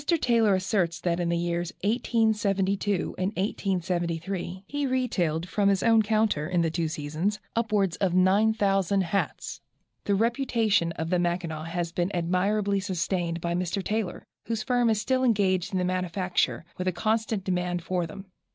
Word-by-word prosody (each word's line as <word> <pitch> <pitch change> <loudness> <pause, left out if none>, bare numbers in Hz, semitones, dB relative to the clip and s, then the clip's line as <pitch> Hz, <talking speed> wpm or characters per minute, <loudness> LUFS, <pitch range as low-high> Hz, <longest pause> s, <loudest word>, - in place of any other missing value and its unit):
Taylor 235 - +3
asserts 185 -3 0
that 170 0 0
in 175 -1 0
the 170 - +1
years 170 0 -1
1872 205 -4 +1
and 185 - +1
1873 180 -1 -2
he 290 +4 -2
retailed 180 -11 0
from 200 +1 +2
his 195 -1 +1
own 225 -1 +5
counter, 210 -8 +1
in 180 -2 +2
the 165 - 0
two 165 0 -1
seasons, 155 +7 -2 0.2
upwards 210 -6 +1
of 185 -3 0
9000 195 0 +3
hats. 190 +2 -2 0.4
The 200 - +2
reputation 225 -5 +1
of 160 +1 -4
the 180 - +3
Mackinaw 170 -3 -2
has 170 0 -3
been 175 +1 0
admirably 195 +4 +1
sustained 175 -3 -2
by 170 0 -1
Mr. 180 +2 -1
Taylor, 210 -4 -2 0.2
whose 225 -2 -1
firm 245 -2 +2
is 220 -2 +2
still 260 +3 +1
engaged 190 -6 +2
in 190 - -1
their 180 - +1
manufacture, 180 -1 -1
with 185 - -2
a - - +3
constant 220 +1 -1
demand 180 -2 -1
for 180 -2 -1
them. 190 +5 -9
190 Hz, 160 wpm, -27 LUFS, 175-215 Hz, 0.4 s, own